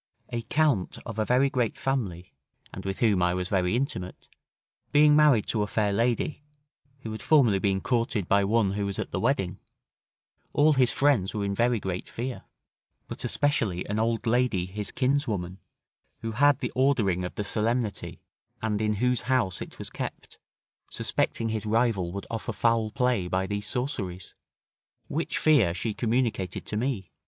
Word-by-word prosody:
A 120 - -3
Count 145 -6 +1
of 115 -2 -5
a 110 - +1
very 125 +4 +3
great 125 -5 -1
family, 100 -10 -3 0.4
and - - -8
with 95 0 -2
whom 105 -6 +3
I 90 0 +2
was 90 0 -3
very 90 0 +1
intimate, 120 -9 -3 0.6
being 150 0 +6
married 150 -8 +5
to 110 - +1
a 105 - 0
fair 105 -1 0
lady, 120 +7 0 0.6
who 110 - -6
had 110 - -6
formerly 125 -11 +4
been 95 -1 0
courted 115 -6 0
by 100 0 +3
one 105 0 +2
who 100 0 -2
was 100 - -4
at - - -4
the - - -2
wedding, 110 -8 0 0.9
all 150 +1 +5
his 130 -3 +3
friends 135 -10 +2
were 105 -1 -1
in 100 - -1
very 120 +2 +2
great 95 -2 -4
fear; 125 +1 -5 0.6
but - - -6
especially 115 -11 0
an 105 +1 -1
old 115 +1 0
lady 115 -6 +2
his 100 +2 -5
kinswoman, 115 -10 -1 0.6
who 115 - -3
had 145 +4 +3
the 125 - -2
ordering 115 -9 +2
of 90 - -5
the 105 - -2
solemnity, 110 +1 -2 0.4
and 110 -1 -1
in 105 0 +1
whose 125 +3 0
house 120 -9 +1
it - - -8
was - - -7
kept, - - -7 0.5
suspecting 115 -1 -1
his 110 -1 -3
rival 110 -6 +1
would 100 +2 -6
offer 115 0 -3
foul 115 +1 +2
play 125 -6 0
by 95 +1 0
these 100 +1 -3
sorceries. 100 -9 -3 0.8
Which 160 +3 -2
fear 120 - +4
she 110 +3 -2
communicated 115 -6 -1
to - - -4
me. 110 -6 -2
110 Hz, 170 wpm, -27 LUFS, 100-125 Hz, 0.9 s, being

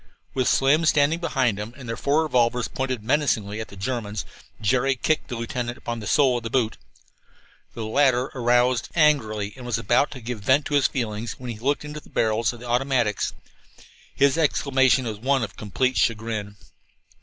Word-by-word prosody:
With 130 -2 0
Slim 140 +5 +3
standing 155 +2 +3
beside 130 -11 0
him, 110 +3 -6
and 130 -3 -10
their 115 - -3
four 145 +6 +1
revolvers 125 -4 +1
pointed 130 -4 -3
menacingly 110 -6 0
at 110 - -6
the - - -13
Germans, 105 -2 -3 0.3
Jerry 130 +5 +2
kicked 155 +4 0
the 125 - -5
lieutenant 120 +1 -4
upon 120 -1 -5
the 105 - -6
sole 130 -4 +3
of - - -17
his 115 - -4
boot. 115 -2 0 1.0
The 115 - -4
latter 130 +2 +2
roused 120 0 +2
angrily 110 -10 +2
and 130 - -11
was 120 -3 -1
about 140 - +2
to 130 - -9
give 115 0 -5
vent 130 +7 +3
to - - -4
his 145 -2 +4
feelings 115 -3 -3
when 125 -1 -7
he 110 - -8
looked 140 +5 -1
into 150 +1 -6
the - - -19
barrels 110 +1 +1
of 120 - -11
the 125 - -9
automatics. 120 -3 0 0.8
His 140 +3 +3
exclamation 135 -4 +2
was 110 -3 -4
one 135 +2 +1
of 105 - -6
complete 130 +5 -1
chagrin. 110 -2 -1
125 Hz, 185 wpm, -24 LUFS, 110-135 Hz, 1.0 s, his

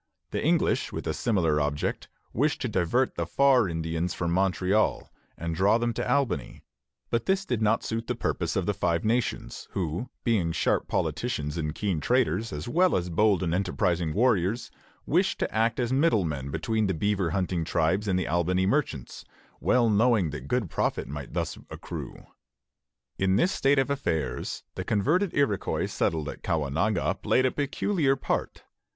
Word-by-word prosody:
The - - -2
English, - - +2
with - - -5
a - - -1
similar 85 -10 +1
object, 75 0 -2 0.3
wished 145 +6 +1
to 130 - 0
divert 110 +5 +1
the - - -3
"Far 130 -7 +4
Indians" 80 +1 -2
from 85 -1 -1
Montreal 95 +3 +1 0.3
and 85 0 -3
draw 100 +6 +3
them 120 0 -1
to - - -2
Albany; 130 - -1 0.5
but 115 -1 0
this 195 0 +1
did 120 - -1
not 110 +1 +2
suit 115 +1 -3
the - - -1
purpose - - -2
of - - 0
the - - +1
Five 85 +2 0
Nations, 115 +2 -1
who, 90 +5 -2
being 100 -9 +1
sharp - - +1
politicians 75 0 -2
and 75 -2 -3
keen 100 -6 -1
traders, 115 - +1
as 75 0 -5
well 180 +8 +3
as 90 -1 -1
bold 100 +1 +3
and 85 -2 0
enterprising 90 -3 0
warriors, 110 +1 +1 0.3
wished - - +2
to - - -3
act 115 +2 +1
as 120 0 0
middle 130 - +3
men 70 -3 -3
between 110 - 0
the 95 - 0
beaver 100 0 0
hunting 90 -1 -1
tribes 85 +6 0
and 95 -2 +2
the 90 - -1
Albany 90 +2 +1
merchants, 95 - -1 0.4
well 125 -2 +3
knowing 110 -5 +3
that 70 -2 -7
good 125 -1 0
profit - - -1
might 70 -1 -7
thus - - -2
accrue. - - -8 0.9
In 95 0 +2
this 175 - +3
state 140 +1 +2
of 135 +1 +2
affairs 80 - -2
the 95 - -4
converted 150 - +1
Iroquois 130 -9 +1
settled 80 -2 -1
at - - -7
Caughnawaga 85 +6 0
played 130 - +2
a 130 - +2
peculiar 145 0 0
part. 135 - -3
100 Hz, 170 wpm, -27 LUFS, 85-120 Hz, 0.9 s, Far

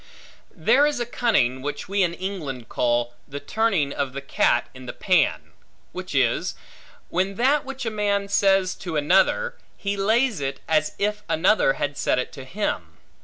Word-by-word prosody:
There 290 +2 +4
is 295 -4 -1
a 240 - -1
cunning, 205 - +1
which 145 +1 -5
we 200 +1 0
in 170 -2 +1
England 155 - -5
call, 120 0 0
the 145 +1 -6
turning 195 -9 0
of 140 -2 -2
the 140 - -5
cat 125 -3 +1
in 130 -1 -11
the - - -5
pan; 180 -6 +1 0.4
which - - -6
is, - - +1 0.5
when 190 +3 0
that 270 +6 +2
which 270 -1 -6
a 225 - -1
man 205 -1 0
says 195 -2 +3
to 170 -4 -5
another, 190 - +2 0.2
he 200 -1 -2
lays 220 - +2
it 135 0 -3
as 155 -1 +1
if 210 +1 -1
another 170 -3 +3
had 145 0 -3
said - - +1
it 125 - -2
to 135 -2 -10
him. 130 - -3
185 Hz, 170 wpm, -24 LUFS, 140-210 Hz, 0.5 s, There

